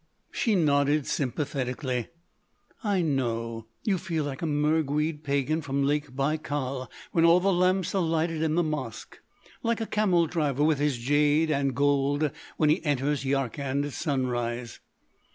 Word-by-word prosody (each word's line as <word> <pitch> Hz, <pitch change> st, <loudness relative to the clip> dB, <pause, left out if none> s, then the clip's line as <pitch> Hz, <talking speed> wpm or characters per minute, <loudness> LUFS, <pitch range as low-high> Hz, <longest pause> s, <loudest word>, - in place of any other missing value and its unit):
She 225 Hz, -5 st, +1 dB
nodded 145 Hz, -3 st, +2 dB
sympathetically: 130 Hz, -2 st, -2 dB, 0.8 s
"I 200 Hz, -4 st, +1 dB
know. 115 Hz, -6 st, -2 dB, 0.2 s
You 195 Hz, -4 st, +1 dB
feel 165 Hz, -4 st, -2 dB
like 140 Hz, -2 st, -5 dB
a 165 Hz, -, -1 dB
Mergued 150 Hz, 0 st, +1 dB
Pagan 140 Hz, +2 st, 0 dB
from 140 Hz, -1 st, -1 dB
Lake 145 Hz, -1 st, 0 dB
Baïkal 140 Hz, -2 st, -2 dB, 0.2 s
when 165 Hz, -, +2 dB
all 170 Hz, +1 st, +6 dB
the 195 Hz, +1 st, +2 dB
lamps 185 Hz, +1 st, +2 dB
are 195 Hz, -, +2 dB
lighted 165 Hz, -1 st, 0 dB
in 160 Hz, -1 st, +1 dB
the 175 Hz, -, +3 dB
Mosque;—like 155 Hz, -, -5 dB
a 225 Hz, -, -1 dB
camel 190 Hz, -6 st, +2 dB
driver 150 Hz, -4 st, 0 dB
with 155 Hz, -2 st, +3 dB
his 145 Hz, -3 st, +1 dB
jade 145 Hz, +5 st, +2 dB
and 140 Hz, -3 st, 0 dB
gold 145 Hz, +1 st, +2 dB, 0.3 s
when 150 Hz, -1 st, +4 dB
he 160 Hz, -, +1 dB
enters 145 Hz, -1 st, 0 dB
Yarkand 135 Hz, +1 st, -1 dB
at 145 Hz, -, -6 dB
sunrise." 125 Hz, -4 st, -2 dB
145 Hz, 145 wpm, -27 LUFS, 135-160 Hz, 0.8 s, all